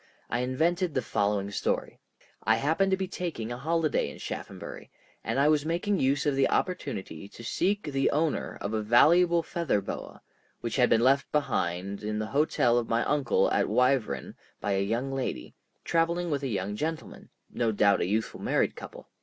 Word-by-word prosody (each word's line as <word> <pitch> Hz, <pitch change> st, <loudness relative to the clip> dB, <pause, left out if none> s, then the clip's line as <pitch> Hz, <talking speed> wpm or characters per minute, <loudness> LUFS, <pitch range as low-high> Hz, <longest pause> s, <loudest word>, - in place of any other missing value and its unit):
I 120 Hz, -, 0 dB
invented 160 Hz, +7 st, 0 dB
the 130 Hz, -, +1 dB
following 100 Hz, -1 st, 0 dB
story. -, -, -2 dB, 0.4 s
I 110 Hz, -, +4 dB
happened 160 Hz, -, +1 dB
to 190 Hz, -, +2 dB
be 190 Hz, 0 st, -2 dB
taking 165 Hz, -11 st, -4 dB
a 120 Hz, -, -4 dB
holiday 160 Hz, +1 st, 0 dB
in -, -, -10 dB
Shaphambury, -, -, -7 dB, 0.3 s
and -, -, -1 dB
I 140 Hz, -, +4 dB
was 150 Hz, -1 st, +3 dB
making 175 Hz, +5 st, 0 dB
use 135 Hz, +2 st, +1 dB
of 145 Hz, -2 st, +2 dB
the 135 Hz, 0 st, +3 dB
opportunity 95 Hz, -, -2 dB
to 115 Hz, -, -12 dB
seek 200 Hz, -, 0 dB
the 135 Hz, -2 st, 0 dB
owner 155 Hz, +1 st, -1 dB
of 100 Hz, -, -3 dB
a 110 Hz, -, 0 dB
valuable 170 Hz, +10 st, +5 dB
feather 170 Hz, -, 0 dB
boa, 100 Hz, -, -7 dB, 0.4 s
which -, -, -3 dB
had -, -, +4 dB
been 115 Hz, -, +4 dB
left 135 Hz, +2 st, +3 dB
behind 100 Hz, -, -1 dB
in 105 Hz, 0 st, -3 dB
the 110 Hz, -, -1 dB
hotel 125 Hz, -5 st, +3 dB
of 115 Hz, -, -5 dB
my 115 Hz, +1 st, +2 dB
uncle 140 Hz, -6 st, +2 dB
at -, -, +1 dB
Wyvern 125 Hz, -, +1 dB, 0.3 s
by 100 Hz, -, -2 dB
a 95 Hz, 0 st, +1 dB
young 115 Hz, +7 st, -1 dB
lady, 135 Hz, -1 st, -4 dB, 0.3 s
traveling 170 Hz, +1 st, +1 dB
with 140 Hz, -2 st, 0 dB
a 140 Hz, -, -2 dB
young 105 Hz, -3 st, -2 dB
gentleman—no 150 Hz, -5 st, -4 dB
doubt 100 Hz, -1 st, +3 dB
a -, -, 0 dB
youthful 110 Hz, +3 st, -2 dB
married -, -, +1 dB
couple. -, -, -10 dB
135 Hz, 180 wpm, -28 LUFS, 110-160 Hz, 0.4 s, valuable